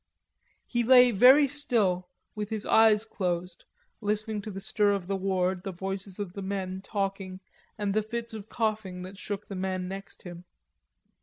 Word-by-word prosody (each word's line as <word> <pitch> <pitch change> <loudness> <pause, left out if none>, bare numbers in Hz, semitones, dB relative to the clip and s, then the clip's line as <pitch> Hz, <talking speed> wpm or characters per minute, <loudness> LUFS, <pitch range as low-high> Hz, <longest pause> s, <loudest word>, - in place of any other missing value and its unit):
He 240 - -1
lay 250 0 +7
very 260 +7 +7
still, 220 -11 0 0.2
with 210 -1 -4
his 220 -2 -4
eyes 220 -1 +5
closed, 180 -4 -3 0.4
listening 210 0 -1
to 215 - -7
the 195 -2 -6
stir 205 +1 +1
of 195 -3 -3
the 195 +2 -2
ward, 190 -1 0
the 195 - -4
voices 190 +1 -5
of 200 -4 -5
men 190 -1 -4
talking 195 -2 -3 0.4
and 205 -2 -1
the 215 - +2
fits 230 +2 -5
of 215 0 -8
coughing 215 -5 -2
that 190 +2 -10
shook 205 0 -5
the - - -7
man 185 -1 -2
next 195 +1 -8
him. 175 -1 -9
200 Hz, 165 wpm, -28 LUFS, 185-215 Hz, 0.4 s, lay